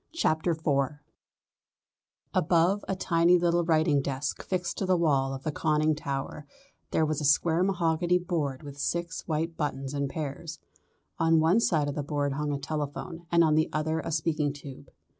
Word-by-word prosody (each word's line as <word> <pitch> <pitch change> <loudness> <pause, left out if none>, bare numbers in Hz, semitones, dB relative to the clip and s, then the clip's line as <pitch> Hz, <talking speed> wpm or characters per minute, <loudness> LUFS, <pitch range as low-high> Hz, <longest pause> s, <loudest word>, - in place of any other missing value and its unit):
CHAPTER 165 - +1
IV 145 -3 0 1.4
Above 175 +5 +2
a 190 - -1
tiny 175 -1 +3
little 175 0 +2
writing 160 -3 +3
desk 135 0 -3
fixed 180 -2 -3
to 190 - -1
the 185 -1 +3
wall 140 -5 +2
of 135 0 -6
the 155 - -1
conning 155 0 +1
tower 145 0 -5 0.4
there 160 - +2
was 155 0 -1
a - - -3
square 160 +4 +3
mahogany 175 -2 +2
board 160 -7 -2
with 140 -1 -9
six 170 +2 -2
white 160 +1 -1
buttons 135 -2 -3
in 140 -1 -1
pairs. 150 +1 -5 0.6
On 165 0 +4
one 165 +7 +4
side 155 -10 +2
of 145 - -2
the 150 - -2
board 145 -1 -1
hung 150 +1 -2
a 140 - -1
telephone 155 +4 -5
and 170 0 +5
on 155 -1 +3
the 155 +1 +2
other 155 +1 -1
a 160 - -4
speaking 155 -2 0
tube. 140 -2 -11
155 Hz, 175 wpm, -28 LUFS, 145-170 Hz, 1.4 s, and